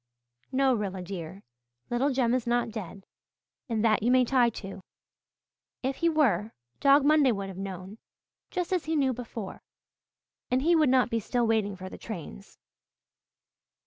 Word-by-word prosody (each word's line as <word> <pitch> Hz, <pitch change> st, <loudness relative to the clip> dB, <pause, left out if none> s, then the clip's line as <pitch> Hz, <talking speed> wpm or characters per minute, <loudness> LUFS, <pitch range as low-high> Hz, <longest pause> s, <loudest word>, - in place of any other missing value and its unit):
No, 265 Hz, 0 st, +3 dB
Rilla 195 Hz, -5 st, -3 dB
dear, 180 Hz, 0 st, -7 dB, 0.5 s
little 260 Hz, +4 st, +1 dB
Jem 250 Hz, -3 st, +1 dB
is 250 Hz, -2 st, -1 dB
not 240 Hz, -1 st, +1 dB
dead, 200 Hz, -3 st, -7 dB, 0.6 s
and 225 Hz, -1 st, 0 dB
that 215 Hz, -1 st, +3 dB
you 230 Hz, -, +1 dB
may 255 Hz, 0 st, +5 dB
tie 245 Hz, -1 st, +3 dB
to. 195 Hz, -3 st, -8 dB, 1.0 s
If 265 Hz, +1 st, -1 dB
he 335 Hz, -, +2 dB
were, 225 Hz, -, +2 dB, 0.3 s
Dog 280 Hz, 0 st, +5 dB
Monday 295 Hz, -3 st, +5 dB
would 200 Hz, -3 st, -3 dB
have 190 Hz, -, -9 dB
known, 195 Hz, +2 st, -7 dB, 0.5 s
just 360 Hz, 0 st, -2 dB
as 360 Hz, -, 0 dB
he 320 Hz, +1 st, -1 dB
knew 270 Hz, -3 st, +2 dB
before, 230 Hz, -4 st, -7 dB, 0.9 s
and 255 Hz, +1 st, +1 dB
he 340 Hz, +2 st, +4 dB
would 310 Hz, -4 st, +4 dB
not 255 Hz, -1 st, +3 dB
be 230 Hz, -, +1 dB
still 240 Hz, +3 st, 0 dB
waiting 215 Hz, -3 st, +1 dB
for 185 Hz, 0 st, -8 dB
the -, -, -10 dB
trains." 165 Hz, -, -9 dB
235 Hz, 160 wpm, -28 LUFS, 200-265 Hz, 1.0 s, may